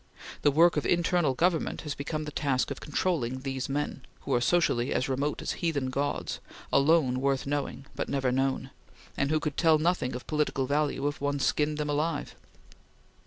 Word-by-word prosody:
The - - +5
work 165 +3 +5
of 150 - 0
internal 175 -5 +2
government 170 +2 +1
has 150 -2 -4
become 150 +2 -4
the 150 - -6
task 140 -2 0
of 140 - -4
controlling 140 -5 -1
these 135 -1 -3
men, 145 -1 -2 0.2
who - - -2
are 120 - +3
socially 135 -5 +2
as 125 - 0
remote 140 +3 -1
as - - -1
heathen 145 -7 0
gods, 145 +2 -2 0.3
alone 140 -3 +4
worth 135 -1 +1
knowing, 140 -1 -3
but - - -3
never 135 -2 +1
known, 135 +1 0 0.4
and 140 - 0
who 155 0 +2
could 150 -2 -3
tell 160 -2 +5
nothing 155 -6 0
of 125 - -7
political 150 -3 0
value 145 0 0
if 145 - -4
one 145 0 0
skinned 150 +2 +1
them 150 -1 -2
alive. 150 +1 -1
145 Hz, 180 wpm, -28 LUFS, 135-155 Hz, 0.4 s, The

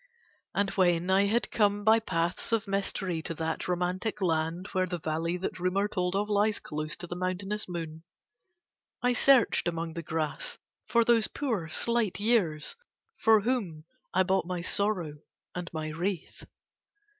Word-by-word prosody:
And 200 -1 +1
when 180 -1 +2
I 195 +1 +5
had 235 +4 0
come 205 -1 +2
by 220 +1 +6
paths 170 -3 -1
of 225 -2 +1
mystery 195 -3 -1
to 165 - -4
that 160 +1 -3
romantic 180 +4 -1
land, 165 0 0
where 185 -1 +1
the 175 0 -3
valley 165 +2 -2
that 185 0 -4
rumour 185 +3 +1
told 180 -2 -1
of 205 +1 0
lies 210 +1 +2
close 155 0 -4
to 175 - -6
the 175 - -6
mountainous 185 +3 -3
moon, 165 -2 -5 1.0
I 245 0 +3
searched 250 -5 +4
among 165 -1 -2
the 170 - -4
grass 155 -3 -2 0.3
for 235 -1 +3
those 230 -2 +4
poor 225 - -2
slight 230 +1 +2
years 205 - +1 0.5
for 220 -1 +6
whom 200 -10 -2 0.3
I 185 - +3
bought 190 -1 +1
my 180 -1 -3
sorrow 175 -5 0 0.3
and 180 -1 -5
my 155 -1 -4
wreath. 175 +3 -4
185 Hz, 155 wpm, -29 LUFS, 165-210 Hz, 1.0 s, by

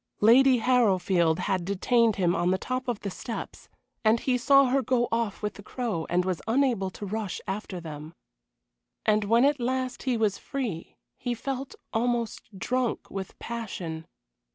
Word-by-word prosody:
Lady 255 +4 +7
Harrowfield 190 -9 +3
had 190 -2 0
detained 220 +4 +2
him 180 -2 +2
on 175 +1 +1
the 185 - +2
top 255 +5 -3
of 240 -4 -2
the 200 - -4
steps, 225 +4 -7 0.3
and 220 +1 +4
he 255 - +1
saw 275 +3 +5
her 265 +2 +2
go 245 -1 +1
off 230 -3 -1
with 210 0 -1
the - - -11
Crow 215 -7 -3
and 180 +1 +2
was 185 -3 -1
unable 235 -5 +2
to 205 - -8
rush 210 -1 -3
after 190 -1 -4
them. 155 0 -8 0.9
And 210 -1 +3
when 230 +5 +4
at 285 -1 +2
last 255 +1 -2
he 255 -3 0
was 215 -3 +1
free 235 - -4 0.2
he 245 -1 -2
felt 270 +3 -4 0.2
almost 230 -3 -1
drunk 250 +4 -1
with 195 -1 -6
passion. 185 -9 -5
225 Hz, 165 wpm, -27 LUFS, 190-250 Hz, 0.9 s, Lady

